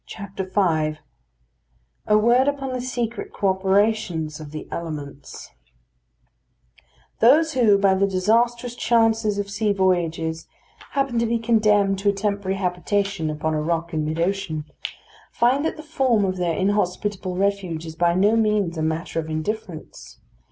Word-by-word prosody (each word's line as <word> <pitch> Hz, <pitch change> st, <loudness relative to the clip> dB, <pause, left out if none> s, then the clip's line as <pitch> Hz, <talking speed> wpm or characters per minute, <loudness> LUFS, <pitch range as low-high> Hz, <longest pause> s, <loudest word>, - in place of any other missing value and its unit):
V 205 Hz, -, -7 dB, 1.8 s
A 210 Hz, -, +5 dB
WORD 240 Hz, +5 st, +4 dB
UPON 275 Hz, -2 st, -2 dB
THE 250 Hz, -, -3 dB
SECRET 240 Hz, -2 st, -4 dB
CO 200 Hz, -, 0 dB
OPERATIONS 190 Hz, -5 st, 0 dB
OF 155 Hz, -2 st, -9 dB
THE 155 Hz, 0 st, -8 dB
ELEMENTS 145 Hz, -4 st, -7 dB, 1.7 s
Those 310 Hz, +7 st, +5 dB
who, 230 Hz, -6 st, +4 dB
by 195 Hz, -1 st, +3 dB
the 195 Hz, +1 st, +2 dB
disastrous 235 Hz, +6 st, +1 dB
chances 225 Hz, -3 st, +2 dB
of 200 Hz, 0 st, -3 dB
sea 210 Hz, +1 st, 0 dB
voyages, 165 Hz, -4 st, 0 dB, 0.5 s
happen 275 Hz, -4 st, 0 dB
to 230 Hz, -, +1 dB
be 235 Hz, +1 st, +1 dB
condemned 210 Hz, -4 st, +2 dB
to 200 Hz, +1 st, +2 dB
a -, -, +2 dB
temporary 200 Hz, -1 st, -2 dB
habitation 190 Hz, -1 st, -1 dB
upon 155 Hz, +1 st, -2 dB
a 155 Hz, -, 0 dB
rock 170 Hz, +1 st, -2 dB
in 155 Hz, -1 st, 0 dB
mid 155 Hz, +2 st, -3 dB
ocean, 170 Hz, -4 st, -1 dB, 0.7 s
find 255 Hz, +4 st, +2 dB
that 320 Hz, -, -2 dB
the 310 Hz, -, -9 dB
form 260 Hz, -9 st, +1 dB
of 185 Hz, -1 st, -2 dB
their 175 Hz, -2 st, 0 dB
inhospitable 190 Hz, -1 st, -1 dB
refuge 190 Hz, -4 st, -1 dB
is 160 Hz, -1 st, -8 dB
by 170 Hz, +1 st, +2 dB
no 205 Hz, +4 st, +3 dB
means 210 Hz, -7 st, +1 dB
a -, -, -1 dB
matter 160 Hz, +1 st, -2 dB
of 160 Hz, -1 st, -5 dB
indifference. 165 Hz, +2 st, -6 dB
200 Hz, 145 wpm, -23 LUFS, 170-225 Hz, 1.8 s, A